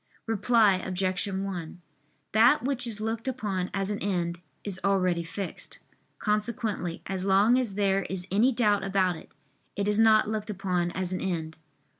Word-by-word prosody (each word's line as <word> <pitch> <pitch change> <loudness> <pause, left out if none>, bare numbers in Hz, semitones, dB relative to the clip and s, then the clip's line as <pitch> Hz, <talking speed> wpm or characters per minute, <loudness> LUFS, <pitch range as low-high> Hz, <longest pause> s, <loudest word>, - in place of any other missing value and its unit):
Reply 225 -2 +3
Obj. 185 0 -1
1: 190 -3 -4 0.5
That 240 +7 +5
which 255 -2 -1
is 215 -3 -3
looked 225 +2 -3
upon 195 -7 -2
as 195 +1 -1
an 205 - -3
end, 175 -3 -1 0.2
is 195 -3 -2
already 185 -3 +2
fixed: 180 +3 -7 0.4
consequently 210 -4 -2
as 190 -1 -3
long 200 +5 +4
as 230 -7 -2
there 195 -1 +2
is 185 -1 -3
any 220 +7 +4
doubt 210 -5 +2
about 190 -2 +1
it, - - -13 0.4
it 200 0 -1
is 210 +1 +2
not 220 -1 +5
looked 215 0 -3
upon 185 -3 -1
as 185 0 -2
an 185 - -3
end. 160 -4 -3
195 Hz, 160 wpm, -27 LUFS, 185-215 Hz, 0.5 s, That